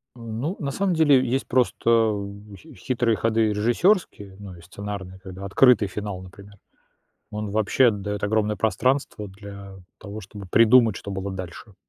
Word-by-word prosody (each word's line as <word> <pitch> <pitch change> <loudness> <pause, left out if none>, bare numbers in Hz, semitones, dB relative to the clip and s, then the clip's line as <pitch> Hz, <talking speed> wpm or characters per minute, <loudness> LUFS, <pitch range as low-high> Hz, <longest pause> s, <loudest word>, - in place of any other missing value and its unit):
Ну, 120 - -4
на 140 - -3
самом 195 +5 0
деле 145 -6 +4
есть 130 +3 -1
просто 115 -4 +2 0.3
хи 155 +9 -15
хитрые 120 -3 0
ходы 115 -1 +1
режиссёрские, 115 - +1
ну, 100 -3 -9
и 85 - -14
сценарные. 95 +1 -8
Когда 95 0 -10
открытый 115 +2 +4
финал, 100 -2 -5
например. 100 +2 -14 0.8
Он 105 -1 -4
вообще 110 +4 +3
даёт 105 0 -5
огромное 105 0 +1
пространство 120 0 0
для 100 0 -11 0.2
того, 105 +1 -8
чтобы 100 0 -10
придумать, 115 +3 +5
что 100 - -7
было 95 0 -4
дальше. 95 +2 -8
105 Hz, 145 wpm, -24 LUFS, 100-120 Hz, 0.8 s, придумать